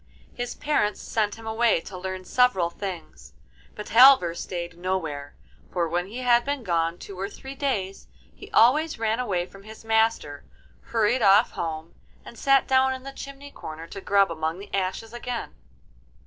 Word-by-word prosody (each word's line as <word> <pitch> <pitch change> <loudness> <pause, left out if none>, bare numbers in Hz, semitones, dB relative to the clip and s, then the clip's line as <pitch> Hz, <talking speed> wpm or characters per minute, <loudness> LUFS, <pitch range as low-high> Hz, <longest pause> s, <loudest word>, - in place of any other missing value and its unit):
His 245 0 -5
parents 290 -9 0
sent 210 -2 -1
him 225 0 -12
away 225 -2 +2
to 190 - -10
learn 185 0 -5
several 190 -8 +2
things, 165 - -8 0.4
but 210 - -7
Halvor 245 -8 +7
stayed 170 -1 -5
nowhere, 160 -6 -3 0.4
for 175 -2 0
when 175 +2 -2
he 235 +6 -7
had 240 -1 +4
been 280 -1 -3
gone 170 -3 0
two 190 0 -10
or 195 +1 -3
three 265 +5 -9
days 220 -9 -3 0.3
he - - -13
always 300 +7 +4
ran 225 +1 0
away 190 -8 -1
from 195 +2 -15
his 220 +2 -13
master, 220 -10 +1 0.4
hurried 230 +2 +1
off 205 +2 +5
home, 160 0 -5 0.3
and - - -11
sat 275 +3 +3
down 265 0 +3
in 260 - -10
the 275 0 -8
chimney 275 +1 -9
corner 160 - -8
to 195 - -8
grub 200 -2 +3
among 160 +1 -2
the 200 +1 -11
ashes 195 +4 -2
again. 240 0 -5
205 Hz, 170 wpm, -25 LUFS, 175-245 Hz, 0.4 s, Halvor